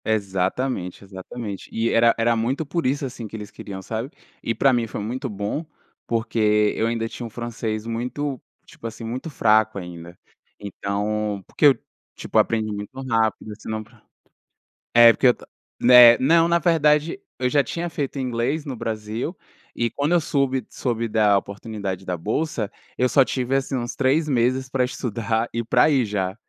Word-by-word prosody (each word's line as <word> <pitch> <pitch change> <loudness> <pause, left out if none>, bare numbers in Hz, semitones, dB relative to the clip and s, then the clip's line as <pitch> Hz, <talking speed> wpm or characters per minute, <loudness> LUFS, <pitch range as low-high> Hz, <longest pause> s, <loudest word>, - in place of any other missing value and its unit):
Exatamente, 100 0 -1
exatamente, 100 +2 -7
e 115 +1 0
era 115 0 +4
era 115 0 +2
muito 130 +7 -1
por 165 0 -1
isso 140 +2 0
assim 125 -3 -6
que 110 - -10
eles 105 -2 -7
queriam, 95 -2 -8
sabe. 115 +5 -4 0.3
E 115 - -2
pra 135 -1 +4
mim 120 -2 +1
foi - - -6
muito 125 +6 -4
bom, 105 +9 -3 0.4
porque 105 -2 +2
eu 110 - +1
ainda 115 -1 -1
tinha 120 - -7
um - - -6
francês 115 -2 -4
muito, 125 +4 -3 0.2
tipo 115 - -9
assim, 115 +1 -8
muito 125 +8 -5
fraco 110 -5 +3
ainda. 85 -1 -8 0.4
Então, 100 +1 -3
porque 150 - +3
eu 135 -4 +5 0.4
tipo - - 0
aprendi 110 -1 +1
muito 105 +5 -7
rápido, 110 -2 0
senão 110 0 -4 1.1
é 120 -1 +9
porque 125 +3 +5 0.5
né 120 -1 +9
não, 165 +5 +4
na 170 0 +3
verdade 155 +1 +2 0.2
eu 125 - +1
já 145 +1 +3
tinha 170 +7 -4
feito 145 -3 -4
inglês 130 +4 -1
no 135 -3 -4
Brasil 110 - -4 0.4
e 120 -1 0
quando 145 +4 0
eu 175 - +5
soube- 135 -4 0
soube 115 -2 -2
da 105 -2 +3
oportunidade 100 -1 -5
da 90 -1 -3
bolsa, 110 - -2 0.3
eu 125 - +3
só 135 +2 +5
tive 130 0 -1
assim 135 0 -1
uns 120 0 -4
3 140 +4 +2
meses 130 0 +1
para 130 -1 +1
estudar 115 -2 -2
e 115 +1 -1
para 115 - +4
ir 135 -3 +3
já, 95 -3 -2
115 Hz, 170 wpm, -23 LUFS, 105-130 Hz, 1.1 s, é